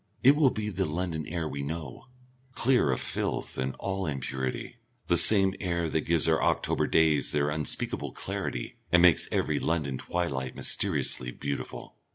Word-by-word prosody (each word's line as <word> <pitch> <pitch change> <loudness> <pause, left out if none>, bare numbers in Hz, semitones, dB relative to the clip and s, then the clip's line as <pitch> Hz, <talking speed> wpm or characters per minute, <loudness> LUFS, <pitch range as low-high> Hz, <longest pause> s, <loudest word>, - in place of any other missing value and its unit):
It 135 +3 +7
will 145 -3 +5
be 105 -3 -3
the 95 -1 -1
London 80 -1 -3
air 85 -1 -3
we 70 -2 -4
know, 75 - -6 0.5
clear 125 - +2
of 65 - -1
filth - - -3
and 65 0 -2
all 95 -1 -3
impurity, 65 - -4 0.3
the 85 - +2
same 95 +1 +5
air 85 -2 -1
that 80 - +1
gives 85 -1 +3
our 80 -1 +3
October - - +1
days 80 -3 +3
their 75 0 +1
unspeakable 75 0 -1
clarity - - -4
and 90 0 +5
makes 85 -3 +5
every - - 0
London 75 -6 -1
twilight 70 -8 -3
mysteriously 60 - +1
beautiful. 70 +2 -6
80 Hz, 160 wpm, -28 LUFS, 70-90 Hz, 0.5 s, It